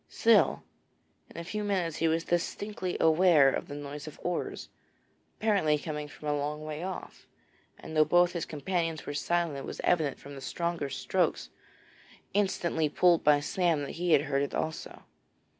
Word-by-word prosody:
Still, 225 -2 +3 0.7
in - - -13
a - - -5
few 210 +5 -4
minutes 185 -6 -1
he 165 - +1
was 165 +1 +1
distinctly 180 +2 -2
aware 160 -4 +5
of - - -3
the 145 - -7
noise 145 +1 -7
of 155 - -10
oars, 175 -1 -3 0.7
apparently 195 -9 +2
coming 150 0 -5
from 150 +1 -10
a 145 - +1
long 150 +1 -3
way 155 0 -5
off, 185 +1 -7 0.5
and 160 - -9
though 155 - +6
both 175 +3 +4
his 170 -3 -3
companions 165 +1 -2
were - - -4
silent, 170 0 0
it 135 - -7
was - - -7
evident 155 -6 +1
from 145 - -11
the 135 - -9
stronger 170 +1 -2
strokes - - -1 0.8
instantly 175 -6 +1
pulled 175 +2 +3
by 145 -1 +5
Sam 165 -1 +1
that 140 - -5
he 175 0 0
had 140 - +6
heard 140 -2 0
it 140 - -2
also. 160 0 -4
160 Hz, 175 wpm, -29 LUFS, 150-175 Hz, 0.8 s, though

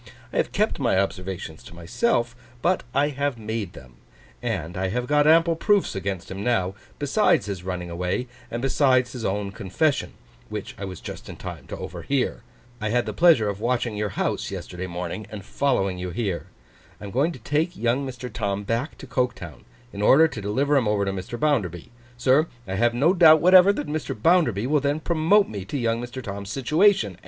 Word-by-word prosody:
I - - -2
have - - +1
kept - - 0
my - - +2
observations 95 -4 -3
to 85 - -13
myself, 120 - 0 0.3
but 180 +1 +2
I 140 +3 +2
have 140 -2 -2
made 110 -3 -4
them; 65 -1 -14 0.4
and 90 -9 -3
I 95 +1 -1
have 120 +6 -2
got 145 +2 +3
ample 165 +1 +5
proofs 205 +4 +2
against 95 -2 -4
him 95 +1 -5
now, 95 -6 +1 0.2
besides 145 - +2
his 100 -4 -5
running 90 -2 -4
away, 90 +7 -2 0.2
and 120 +2 -4
besides 130 -2 +3
his 125 -3 -6
own 100 0 -2
confession, 115 - -1 0.4
which - - -5
I 100 - -4
was 95 -3 -8
just - - -8
in - - -7
time - - -8
to - - -6
overhear. 135 -3 -2 0.4
I 110 - -1
had 120 +2 +1
the - - -4
pleasure 165 -11 +5
of 100 -1 -3
watching 120 -1 0
your 105 0 -1
house - - -1
yesterday 90 +1 -6
morning, 90 +4 -5
and 100 -3 -8
following 100 -11 0
you 90 0 -4
here. 95 -2 -3 0.5
I - - -12
am 100 - -6
going 140 - +1
to - - -9
take 155 +9 -1
young 120 +4 +1
Mr. 125 -2 -6
Tom 100 -3 -2
back 115 +8 -2
to - - -10
Coketown, 120 - -3 0.3
in 100 - -5
order 150 +9 +6
to 115 -9 -7
deliver 135 +9 +1
him 125 -5 +2
over 105 -1 +1
to 95 - -1
Mr. 95 +5 -6
Bounderby. 105 - 0 0.3
Sir, 135 +6 +3 0.2
I 95 - -4
have 120 +4 +2
no 150 +9 +4
doubt 160 -4 +7
whatever 185 +4 +7
that 145 - -4
Mr. 150 -7 -4
Bounderby 120 - +3
will 145 +2 +2
then 145 +2 0
promote 170 +6 +3
me 100 -3 -6
to 120 - -4
young 115 -2 0
Mr. 120 +1 -7
Tom's 100 -1 -6
situation. 135 - +2
120 Hz, 200 wpm, -24 LUFS, 100-145 Hz, 0.5 s, doubt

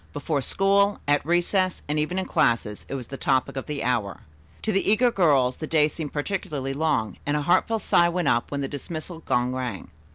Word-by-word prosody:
Before 145 -4 -1
school, 200 +7 +2
at 145 0 +2
recess, 175 +3 +1
and 150 +1 0
even 155 +5 -1
in 190 - -1
classes 110 -3 0
it - - -3
was 125 -4 -6
the 135 - -6
topic 130 -1 0
of 135 - -5
the 150 -2 -3
hour. 115 -5 -1 0.4
To 220 - +1
the 195 -1 +1
eager 240 +3 +4
girls 140 - +3
the 155 - -5
day 150 -2 +3
seemed 155 -1 -6
particularly 145 -4 -3
long, 140 - -1
and 145 +1 0
a 150 - -2
heartfelt 215 +7 +2
sigh 170 0 +4
went 175 -2 -1
up 120 -2 +1
when 140 0 -3
the 135 - -2
dismissal 155 +4 -6
gong 125 -5 0
rang. 125 -6 -5
150 Hz, 205 wpm, -25 LUFS, 130-175 Hz, 0.4 s, eager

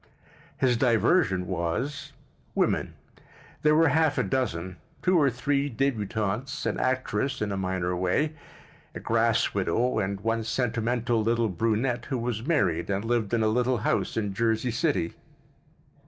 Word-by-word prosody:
His 125 -3 +2
diversion 115 - +2
was—women. 135 - -3 0.7
There 150 0 +4
were 165 0 +5
half 150 0 +2
a 125 - +2
dozen: 95 -6 -2 0.3
two 185 0 +3
or 145 -5 +5
three 140 +3 0
dķbutantes, 110 -2 -2
an - - -1
actress 130 0 -1
(in 105 -1 -2
a - - -1
minor 95 -2 -1
way), 95 - 0 0.6
a - - -4
grass - - +1
widow, 120 +6 +1
and 100 -1 -2
one 115 +1 0
sentimental 120 0 0
little 115 0 +1
brunette 115 +5 0
who 135 - -2
was 120 0 -3
married 95 - +1
and 100 +2 -1
lived 115 -3 0
in 115 -2 +2
a - - +3
little 125 +3 +1
house - - 0
in 105 -3 -1
Jersey 115 +3 0
City. 120 - 0
115 Hz, 140 wpm, -27 LUFS, 100-135 Hz, 0.7 s, were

